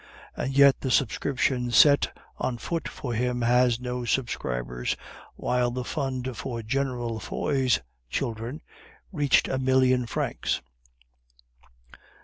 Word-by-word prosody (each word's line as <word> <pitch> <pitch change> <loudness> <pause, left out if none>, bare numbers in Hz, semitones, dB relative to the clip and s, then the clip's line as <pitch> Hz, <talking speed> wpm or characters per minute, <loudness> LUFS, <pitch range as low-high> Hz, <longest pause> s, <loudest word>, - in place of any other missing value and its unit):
And 135 +1 -3
yet 140 -1 +6
the 130 - -2
subscription 125 0 +1
set 140 +5 +6 0.3
on 125 -2 -1
foot 165 +7 -3
for 125 -3 -5
him 125 +1 0
has 120 0 +3
no 125 0 -3
subscribers, 60 - -2 0.4
while 125 -1 +1
the 125 +1 -3
fund 130 -2 -3
for 115 -1 -5
General 120 -2 -2
Foy's 130 - 0 0.3
children 120 - -3 0.5
reached 145 -6 +3
a 130 - -1
million 130 -1 +3
francs. - - -2
125 Hz, 115 wpm, -26 LUFS, 120-135 Hz, 0.5 s, yet